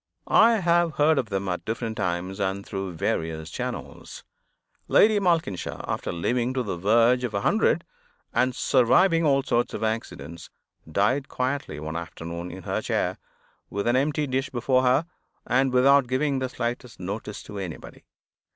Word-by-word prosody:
I 230 +2 +5
have 175 -5 +2
heard 150 0 +4
of 115 - -3
them 100 -1 -2
at 90 -1 -2
different 115 0 -3
times 90 +2 -2
and 100 0 -2
through 95 -2 -4
various 80 0 -2
channels. - - -6 0.6
Lady 215 0 +5
Malkinshaw, 165 - -1
after - - -2
living 120 +9 -1
to 130 - 0
the 100 - -3
verge 115 +7 +3
of 120 -4 -3
a 100 - 0
hundred, - - +2 0.5
and 125 +1 +1
surviving 165 +10 +3
all 140 -1 +3
sorts 120 -1 0
of - - -4
accidents, 110 -6 -4 0.4
died 130 - +1
quietly 130 - -2
one 80 +1 -5
afternoon, 85 +1 -6
in 95 +1 -9
her - - -2
chair, - - -1 0.5
with 100 0 -3
an 120 +1 +2
empty 145 +3 +1
dish 135 0 -1
before 130 +1 +1
her, 130 +5 +3 0.4
and 130 +2 +2
without 135 +1 +5
giving 135 +2 0
the 130 -1 -2
slightest 120 -1 -4
notice 100 +3 -5
to 105 - -8
anybody. 90 -5 -8
120 Hz, 160 wpm, -25 LUFS, 95-135 Hz, 0.6 s, I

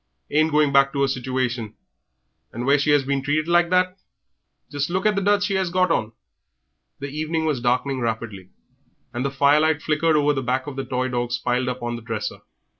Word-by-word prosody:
Ain't 155 +2 +3
going 150 -2 +2
back 135 0 +4
to 140 -1 +1
'er - - +3
sitooation, 125 -4 -2 0.8
and 120 +2 -5
where 140 +2 +4
she 145 +1 +2
'as 145 -2 +4
been 140 0 0
treated 150 +3 0
like 175 0 +3
that 185 +1 +1 0.7
just 145 +1 -2
look 190 +3 -2
at 215 - +4
the 200 - -1
duds 205 +1 +2
she 200 -2 -1
'as 185 -2 -1
got 185 0 +1
on." 110 -8 -1 0.8
The 140 +1 -6
evening 155 +2 -2
was 145 -6 -1
darkening 125 +2 0
rapidly, 110 -5 -4 0.6
and 120 +1 -2
the 140 - 0
firelight 145 +3 +3
flickered 155 +1 +1
over 150 0 +3
the 135 - -2
back 130 +1 -1
of 145 - -7
the 135 - -3
toy 130 0 -2
dogs 120 -1 -1
piled 125 +1 -1
up 125 0 -5
on 120 0 -3
the - - -10
dresser. 110 -2 -4
140 Hz, 205 wpm, -23 LUFS, 125-155 Hz, 0.8 s, back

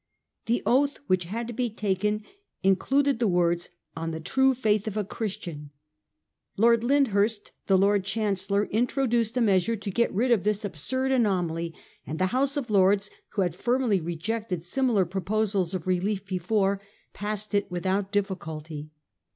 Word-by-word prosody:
The 235 +1 +1
oath 280 +3 +3
which 185 -5 +1
had 225 +7 -4
to 240 - -5
be 245 +1 -1
taken 210 0 -1 0.4
included 270 +8 +2
the 235 - +2
words 175 -1 +1
' - - -47
on 165 0 -3
the 160 0 -4
true 265 +10 +2
faith 215 -4 +1
of 215 0 -3
a 210 - +1
Christian.' 180 -8 -5 0.9
Lord 230 +2 +4
Lyndhurst, 225 -6 +2 0.2
the 195 - +5
Lord 200 +1 +3
Chancellor, 200 -1 0
introduced 240 0 +1
a - - +3
measure 200 0 +3
to 205 -2 -5
get 235 +5 +1
rid 240 +6 +1
of 225 -6 +3
this 210 0 0
absurd 260 - -2
anomaly; 175 -9 0 0.3
and 155 - -4
the 185 - +2
House 275 +2 +1
of 245 -6 -3
Lords, 200 +1 +3 0.2
who 200 - +2
had 175 -3 -1
firmly 240 0 +1
rejected 180 +2 -3
similar 225 0 +1
proposals 195 0 -1
of 175 - -4
relief 190 +2 0
before, 195 +1 0 0.3
passed 210 +1 -4
it 205 -1 +1
without 185 +3 0
any 195 - -29
difficulty. 160 -7 -3
205 Hz, 160 wpm, -27 LUFS, 185-230 Hz, 0.9 s, the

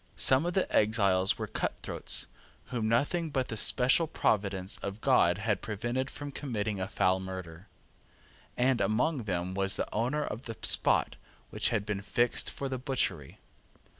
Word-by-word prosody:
Some 135 +6 +5
of 175 - -2
the 190 - +2
exiles 100 -3 +3
were - - -3
cutthroats, - - -2 0.4
whom 115 -3 -1
nothing 155 +8 +1
but 135 -4 -2
the 110 - -3
special 130 +8 +3
providence 100 - -1
of 100 +2 -5
God 105 -9 +3
had 105 0 -1
prevented 120 +5 -3
from 145 -1 -7
committing 110 -8 -3
a 95 - -2
foul 95 -1 +1
murder; 95 -1 -8 0.9
and 125 0 +2
among 125 +3 0
them 90 -2 -2
was 95 0 +2
the - - -2
owner 125 +7 0
of 115 -2 -6
the 115 -2 -7
spot - - +3 0.3
which - - 0
had 105 -3 -1
been 105 -2 -3
fixed 120 +4 0
for 140 - -5
the 130 -1 -4
butchery. 125 - -2
110 Hz, 160 wpm, -30 LUFS, 95-130 Hz, 0.9 s, Some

